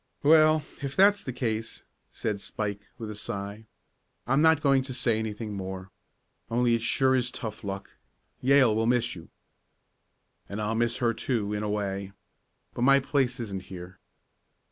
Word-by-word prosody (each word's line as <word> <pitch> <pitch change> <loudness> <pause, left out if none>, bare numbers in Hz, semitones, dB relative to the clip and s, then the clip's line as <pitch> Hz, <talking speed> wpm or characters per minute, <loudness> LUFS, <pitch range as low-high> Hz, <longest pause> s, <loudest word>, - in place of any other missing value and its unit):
"Well, 155 0 +6 0.2
if 140 -1 -4
that's 200 +1 +5
the 130 - -4
case," 115 -3 -3 0.3
said 105 -3 -3
Spike, 100 -1 -4
with 110 -2 -6
a - - -7
sigh, 100 +1 -6 0.6
"I'm 135 +4 +2
not 160 -1 +5
going 135 -2 +4
to 130 -1 -6
say 115 -3 +1
anything 110 -1 -4
more. 95 -1 -6 0.6
Only 120 0 +2
it 115 - +1
sure 130 +3 +3
is 125 -1 +1
tough 110 -3 -6
luck. 95 -1 -6 0.4
Yale 130 -3 +5
will 115 +1 +1
miss 120 -1 +2
you." 85 -2 -11 1.2
"And 100 - -4
I'll 105 +1 -1
miss 120 +1 +1
her, 120 -2 +1
too, 110 -2 -2
in 105 - -2
a 105 - -2
way. 100 -2 -3 0.6
But - - -5
my 135 +2 +6
place 130 -2 0
isn't 100 -4 -5
here." 90 0 -10
115 Hz, 165 wpm, -28 LUFS, 105-130 Hz, 1.2 s, Well